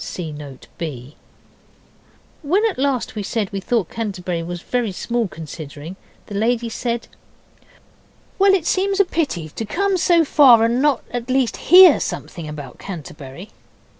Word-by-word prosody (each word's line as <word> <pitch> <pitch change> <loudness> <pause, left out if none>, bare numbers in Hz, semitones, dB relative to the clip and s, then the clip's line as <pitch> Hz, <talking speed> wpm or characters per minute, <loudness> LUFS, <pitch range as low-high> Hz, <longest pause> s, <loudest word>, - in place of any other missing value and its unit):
(See 165 -4 -5
Note 145 -3 -10
B.) 140 -4 -6 1.3
When 365 +8 +1
at 390 - -4
last 270 -3 0
we 215 - -4
said 205 0 -2
we 200 - -3
thought 210 -1 -1
Canterbury 185 -6 -3
was 175 +1 -6
very 245 -4 -1
small 235 +4 -2
considering, 155 0 -9 0.3
the - - -10
lady 230 +3 0
said 235 +1 -3 1.3
'Well, 390 0 +6
it 350 -5 -2
seemed 390 +2 +1
a 400 - +6
pity 285 - -2
to 225 - -6
come 390 - 0
so 340 -1 +3
far 255 -6 +6
and 235 +3 +1
not 290 -2 +2
at 245 0 -4
least 255 -4 +1
hear 365 +1 +9
something 160 -3 -5
about 145 -4 -9
Canterbury. 155 -1 -9
225 Hz, 150 wpm, -20 LUFS, 170-280 Hz, 1.3 s, hear